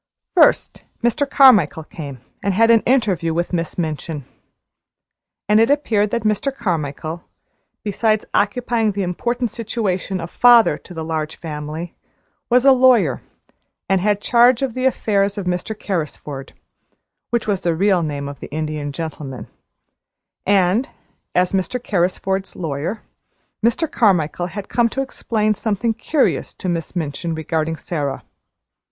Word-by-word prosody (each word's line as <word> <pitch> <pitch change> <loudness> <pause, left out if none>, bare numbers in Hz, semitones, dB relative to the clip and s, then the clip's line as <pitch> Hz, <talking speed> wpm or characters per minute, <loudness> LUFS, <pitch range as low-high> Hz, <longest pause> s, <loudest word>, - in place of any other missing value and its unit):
First, - - +3 0.2
Mr. 240 +4 +1
Carmichael 215 - +5
came 145 - -9 0.2
and 200 -2 0
had 230 +3 +5
an 230 - +6
interview 200 -10 +1
with 175 +2 -2
Miss 165 -2 -2
Minchin. 155 -3 -3 1.2
And 210 +1 +5
it 225 - +4
appeared 225 -8 +2
that 235 0 -2
Mr. 215 +6 0
Carmichael, 165 - -3 0.6
besides 215 +1 +1
occupying 225 0 +1
the 200 0 -2
important 235 +6 -2
situation 200 -5 -2
of 170 0 -6
father 240 -2 +5
to 180 - -13
the 160 - -4
Large 160 -1 -3
Family 155 +1 -6 0.6
was 250 +2 +4
a 275 - +8
lawyer, 250 - +4 0.7
and 195 -1 +2
had 205 +1 +1
charge 240 +2 +4
of 260 -4 -1
the 255 +2 -2
affairs 205 -6 +1
of 200 - -3
Mr. 180 +4 -2
Carrisford 150 -6 -4 0.8
which 235 -1 0
was 200 -3 0
the 170 -2 0
real 190 +1 +3
name 145 -3 -3
of 140 0 -8
the - - -8
Indian 150 -1 -3
Gentleman 145 -4 -6 1.0
and, 200 +6 +3 0.5
as 180 0 +3
Mr. 195 +6 -1
Carrisford's 190 -2 -1
lawyer, 160 +6 -4 0.6
Mr. 235 +9 +2
Carmichael 175 - +2
had 195 +3 -7
come 235 -1 +2
to 270 +4 -2
explain 215 -5 -1
something 220 +2 -1
curious 270 +6 0
to - - -6
Miss 170 0 -3
Minchin 165 0 -3
regarding 160 0 -2
Sara. 150 -4 -4
195 Hz, 140 wpm, -20 LUFS, 160-230 Hz, 1.2 s, a